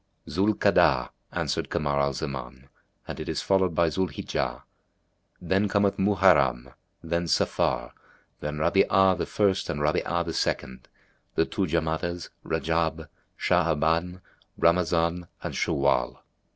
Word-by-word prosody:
"Zú'l 100 +3 +1
Ka'adah," 85 -10 +3 0.2
answered - - -2
Kamar 70 -1 0
al 70 0 +1
Zaman, 65 -2 -6 0.4
"and - - -6
it - - -5
is - - -2
followed 95 -3 +2
by 85 0 +3
Zú'l 95 +3 -1
hijjah; - - -3 0.8
then 95 +2 +1
cometh 100 0 +1
Muharram, 75 -11 +3 0.3
then 85 +1 -1
Safar, - - 0 0.5
then 75 0 -4
Rabí'a 95 +3 +3
the 85 - -3
First 100 -2 +1
and 75 - -2
Rabí'a 85 +3 0
the 85 - -4
Second, 65 +1 -2 0.5
the 80 - +3
two 95 -2 -2
Jamádás, 85 +2 -2
Rajab, 80 -1 -1 0.3
Sha'aban, 85 +4 +1 0.4
Ramazán 85 0 +2 0.2
and - - -4
Shawwál." 70 -3 +1
85 Hz, 125 wpm, -26 LUFS, 75-95 Hz, 0.8 s, Ka'adah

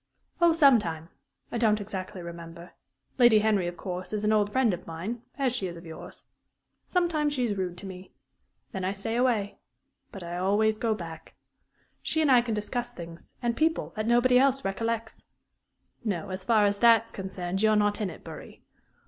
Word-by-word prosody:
"Oh, 340 -1 +6
some 280 -7 +6
time. 165 -3 -5 0.4
I 235 - -2
don't 215 -2 +3
exactly 190 -2 -6
remember. 170 0 -9 0.5
Lady 240 -3 +7
Henry, 210 -4 +2
of 175 0 -5
course, 180 +2 -5
is 210 0 -2
an 210 +1 +3
old 205 -1 +2
friend 255 -5 +2
of 175 - -7
mine, 185 +9 -5 0.2
as 260 -3 0
she 195 -7 -1
is 170 -1 -7
of 170 - -12
yours. 160 -1 -10 0.6
Sometimes 325 -5 +1
she 255 -3 0
is 225 -4 0
rude 180 -2 -3
to 195 - -10
me. 185 0 -9 0.6
Then 190 -5 -4
I 190 +1 0
stay 215 +3 -4
away. 235 -5 +1 0.5
But 195 - -8
I 170 +1 -5
always 210 +4 +2
go 225 -2 +1
back. 165 -4 -9 0.7
She 315 - -1
and 305 -3 +3
I 250 -2 +7
can 235 -2 -2
discuss 240 +3 -3
things 170 -1 -10
and 235 -1 +1
people 320 +1 0
that 215 0 -2
nobody 245 +1 +5
else 270 0 +2
recollects 225 +3 -3 0.8
no, 195 -6 -2
as 185 0 -4
far 215 0 +4
as 200 0 +1
that's 230 0 +5
concerned, 190 -1 -4
you're 215 0 +4
not 205 +1 +2
in 205 - -1
it, 165 - -11
Bury. - - -11
210 Hz, 190 wpm, -28 LUFS, 185-235 Hz, 0.8 s, Lady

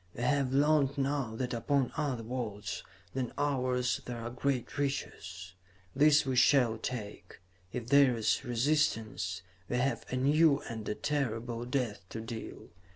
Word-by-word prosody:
We 120 - -4
have 140 0 +2
learned 140 0 +3
now 135 -4 -1
that 125 +1 -2
upon 130 +2 +1
other 140 -7 -1
worlds 110 -6 -4 0.3
than 130 -3 -2
ours 125 -3 0
there 120 -1 -5
are 115 +1 -5
great 130 +2 -2
riches. 95 -10 -3 0.4
These 150 0 +5
we 130 -1 0
shall 125 -3 +4
take. 110 -4 -6 0.3
If 120 0 -5
there 140 -3 +6
is 110 +4 +1
resistance, 115 - 0 0.3
we 125 - 0
have 135 +3 0
a - - -2
new 145 +3 +4
and 110 -2 -6
a 105 - -1
terrible 120 -5 -2
death 125 -5 -1
to 115 - -5
deal. 115 0 -7
125 Hz, 150 wpm, -31 LUFS, 115-140 Hz, 0.4 s, there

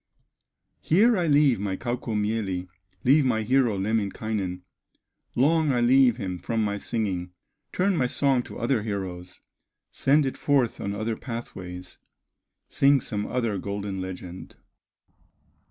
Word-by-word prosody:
Here 220 +9 +4
I 175 -4 0
leave 145 -5 +4
my 95 -2 -2
Kaukomieli, 105 -6 -2 0.4
Leave 140 +4 +5
my 115 -4 +1
hero 125 -2 +2
Lemminkainen, 100 -2 -2 0.7
Long 155 +3 +3
I 125 - +1
leave 125 0 +5
him 95 -6 -4
from 115 +3 -1
my 100 -1 -1
singing, 95 -6 -3 0.4
Turn 190 +1 +1
my 130 -6 +1
song 135 0 +1
to - - -9
other 120 -1 0
heroes, 95 -4 -5 0.5
Send 145 +2 +3
it 135 - -3
forth 135 -5 +1
on 100 0 -3
other 110 +2 -2
pathways, 90 -7 -8 0.7
Sing 140 0 +4
some 105 -4 -4
other 115 -6 -1
golden 100 0 -4
legend. 90 -1 -8
110 Hz, 125 wpm, -26 LUFS, 100-130 Hz, 0.7 s, Leave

